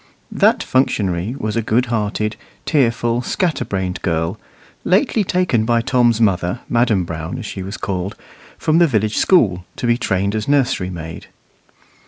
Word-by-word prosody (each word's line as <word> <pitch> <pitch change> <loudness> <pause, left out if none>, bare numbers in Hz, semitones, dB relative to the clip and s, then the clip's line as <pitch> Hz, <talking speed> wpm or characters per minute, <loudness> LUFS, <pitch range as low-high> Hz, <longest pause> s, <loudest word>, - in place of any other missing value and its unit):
That - - +3
functionary 105 -5 0
was 110 -4 -3
a 115 - +1
good 115 +3 +1
hearted, 105 -2 -1 0.3
tearful, 120 -4 +1
scatter 175 +5 -1
brained 95 -1 -3
girl, 80 -2 -1 0.4
lately 215 +2 +2
taken 180 - +1
by 115 +1 +2
Tom's 120 -2 +2
mother, 90 -5 +1
Madam 115 -5 +2
Brown, 80 +5 -5
as 125 - -6
she 95 - -6
was 95 +2 -6
called, 95 0 -3 0.4
from 160 +1 +2
the 170 - +6
village 110 -5 0
school 95 - +3
to - - -4
be 120 0 +2
trained 100 -3 0
as 110 -1 -2
nurserymaid. 90 - -1
110 Hz, 150 wpm, -19 LUFS, 95-125 Hz, 0.4 s, the